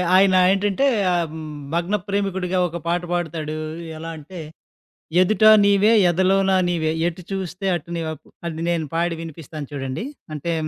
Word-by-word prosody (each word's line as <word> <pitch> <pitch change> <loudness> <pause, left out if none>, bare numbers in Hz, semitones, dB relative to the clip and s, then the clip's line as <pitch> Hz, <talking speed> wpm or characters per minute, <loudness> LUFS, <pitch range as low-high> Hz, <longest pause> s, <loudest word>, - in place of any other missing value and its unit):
ఆయన 190 0 +5 0.2
ఏంటంటే 200 +6 +1 0.5
హ్మ్, 160 -1 -7 0.3
భగ్న 175 +4 0
ప్రేమికుడిగా 190 -2 -1
ఒక 170 +1 -6
పాట 175 +1 +1
పాడుతాడు. 160 -3 -3 0.4
ఎలా 165 +1 -6
అంటే 165 +4 -10 0.8
"ఎదుట 215 +4 +2 0.2
నీవే, 200 +2 +4 0.2
ఎదలోనా 190 +2 +3
నీవే, 160 -3 0 0.2
ఎటు 175 +1 -5
చూస్తే 190 0 -4
అటు 170 0 -7
నీవే" 160 -1 -3 0.3
అది 160 -1 -5
నేను 170 -2 0
పాడి 170 0 0
వినిపిస్తాను 155 -2 -8
చూడండి. 135 - -4 0.3
అంటే 165 +3 -2
175 Hz, 135 wpm, -22 LUFS, 160-190 Hz, 0.8 s, ఆయన